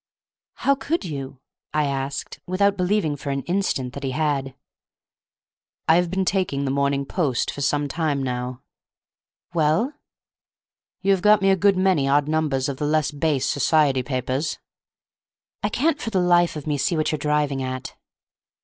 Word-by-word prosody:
"How 275 - +2
could 295 - -2
you?" 135 -4 -6 0.3
I 150 -1 +3
asked, 140 0 -3
without 200 +2 +2
believing 180 -4 +1
for 140 0 -6
an 140 -1 -2
instant 175 -9 -1
that 140 - -7
he 135 - -1
had. 140 -3 -1 1.3
"I 160 - +6
have 175 -1 +1
been 190 +1 0
taking 180 -8 0
the 135 - 0
Morning 140 0 +1
Post 140 -6 0
for 145 - -7
some 145 +1 +1
time 145 -2 -1
now." 125 0 -4 0.9
"Well?" 165 - +2 1.1
"You 195 - +3
have 190 -2 +2
got 210 +1 +6
me 195 - +5
a - - +5
good 195 +1 +3
many 185 -7 +2
odd 145 +1 +3
numbers 150 -4 0
of 140 -2 -3
the 145 - -1
less 155 -1 +1
base 145 -2 0
society 145 -2 +2
papers." 130 +3 -2 1.0
"I - - 0
can't 300 +3 0
for - - -3
the 195 -4 +1
life 175 -1 +3
of 150 - -6
me 150 -2 -1
see 170 - +1
what 155 - +1
you're 155 - -2
driving 150 -2 0
at." 130 0 -5
150 Hz, 165 wpm, -23 LUFS, 140-180 Hz, 1.3 s, I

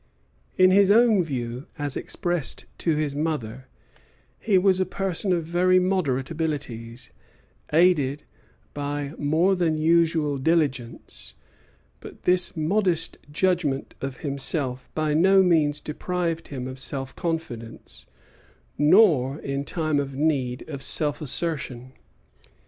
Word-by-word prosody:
In 185 0 +6
his 200 0 +5
own 220 -3 +5
view, 125 -3 -5
as 145 -2 -3
expressed 175 -6 -3
to 165 -3 +1
his 150 -2 -1
mother, 130 -5 -3 0.7
he 205 -4 +2
was 185 0 +3
a - - +3
person 190 0 -1
of 175 -2 +1
very 180 +3 +3
moderate 175 -8 0
abilities, 140 -8 -4 0.6
aided 150 -4 +3 0.5
by 145 0 -4
more 160 +6 +2
than 165 -3 +1
usual 160 -3 +2
diligence; 135 -6 -1 0.6
but - - -12
this 180 -1 +2
modest 170 0 0
judgment 155 -5 0
of 135 -1 -4
himself 135 -2 -3
by 155 -1 0
no 190 +5 +5
means 155 -5 +2
deprived 165 +1 -3
him 130 -3 -5
of 130 0 -7
self 135 0 -6
confidence, 160 -10 -5 0.7
nor, 150 - +5
in 140 0 -3
time 155 0 -1
of 135 -1 -4
need, 135 -4 -1
of 140 -3 -6
self 145 +2 -1
assertion. 135 -4 -4
155 Hz, 120 wpm, -25 LUFS, 135-175 Hz, 0.7 s, In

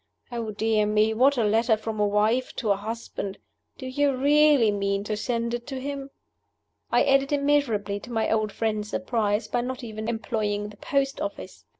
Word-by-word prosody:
Oh, 230 -2 -3
dear 215 0 +1
me, 215 +1 +3
what 265 +5 +4
a 235 - +2
letter 220 +2 +3
from 215 0 -5
a 210 - +3
wife 215 +5 +1
to 220 -5 0
a - - +4
husband! 205 -1 -5 0.4
Do 260 - -8
you 275 +1 +1
really 285 -3 +5
mean 200 0 -1
to 215 +1 -2
send 235 +1 -2
it 240 0 -4
to 270 -2 -4
him?" 275 0 -5 0.8
I - - +4
added 275 0 +3
immeasurably 280 -9 +1
to 240 - -11
my 225 -1 0
old 215 -1 +1
friend's 215 -1 -2
surprise 215 -2 0
by 245 - 0
not 255 +1 -5
even 220 -1 -5
employing 210 -2 -2
the 210 - -14
post 275 +2 -1
office. 200 - -6
225 Hz, 185 wpm, -26 LUFS, 210-260 Hz, 0.8 s, really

